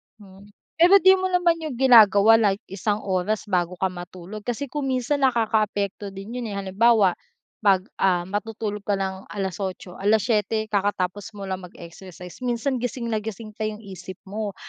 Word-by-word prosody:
Hmm, 200 -2 -16 0.3
pero 355 +4 +7
di 380 - +8
mo 375 - 0
naman 355 -2 +2
yun 310 -5 -5
ginagawa 225 -3 +6
like 200 -2 +1
isang 205 +2 -2
oras 195 +2 -1
bago 180 -1 0
ka 190 +1 -1
matulog 180 +3 -9
kasi 255 +2 -3
kung 290 -2 -3
minsan 260 +2 0
nakakaapekto 215 -6 0
din 195 +5 -7
yun, 240 - -4
eh, 205 - -5
halimbawa 200 0 +2 0.4
pag, 195 -3 +3 0.2
ah, 180 -2 +2
matutulog 210 +2 -4
ka 205 - +2
ng 190 0 -4
alas 190 -3 -4
8, 185 -2 -6
alas 210 +1 +2
7 220 -1 0
kakatapos 205 +1 -2
mo 200 - -7
lang 190 -1 -4
mag-exercise 180 +1 -12
minsan 250 +1 -1
gising 235 -1 -3
na 220 - 0
gising 215 0 -7
pa 215 +1 -3
yung 215 +1 -7
isip 185 -2 -9
mo. 205 0 -5
210 Hz, 170 wpm, -24 LUFS, 190-230 Hz, 0.4 s, di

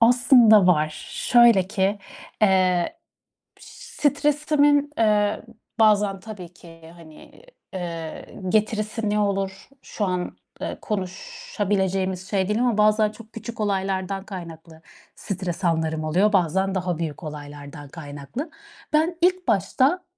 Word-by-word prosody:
Aslında 235 -4 +6
var. 155 -3 +1
Şöyle 235 -6 +4
ki, 200 0 0 0.4
eee, 185 - +3 0.6
piş - - -17
stresimin, 290 0 +1
eee, 210 -2 +2 0.4
bazen 205 -3 +3
tabii 185 -4 -10
ki 165 -2 -15
hani, 160 - -16 0.3
eee, 170 -3 -6 0.2
getirisi 215 +1 0
ne 210 0 +1
olur 195 0 -2
şu 210 - -3
an, 180 -1 -3 0.2
eee, - - -4
konuşabileceğimiz 190 -1 -3
şey 195 -2 0
değil 210 +2 0
ama 245 -4 +1
bazen 215 0 +4
çok 225 0 -15
küçük 230 +1 -8
olaylardan 195 -1 -1
kaynaklı 165 -5 -10 0.3
stres 185 -1 -5
anlarım 160 -2 0
oluyor, 185 +7 +2
bazen 190 +1 +1
daha 180 -2 -1
büyük 165 0 -5
olaylardan 145 -1 -9
kaynaklı. 150 - -7 0.4
Ben 325 +3 +2
ilk 365 +1 +2
başta 255 - +2
195 Hz, 115 wpm, -23 LUFS, 175-220 Hz, 0.6 s, Aslında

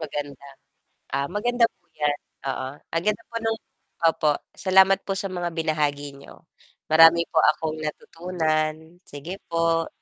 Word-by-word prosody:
Maganda, 145 -2 -6 0.7
ah 140 +1 0
maganda 235 +4 +1
po 175 - -45
'yan 145 -1 0 0.3
oo, 130 0 -2 0.2
ang 165 +1 0
ganda 210 +2 0
po - - -5
ng 225 0 0 0.5
opo 160 -2 +3 0.2
salamat 190 0 +5
po 195 - -2
sa 195 - -2
mga 175 -1 -2
binahagi 145 -3 -1
niyo 140 - -15 0.5
marami 165 +1 +8
po 160 - +4
akong 155 0 +1
natutunan, 160 0 -2
sige 170 +8 -7
po. 165 0 +1
165 Hz, 140 wpm, -24 LUFS, 150-180 Hz, 0.7 s, marami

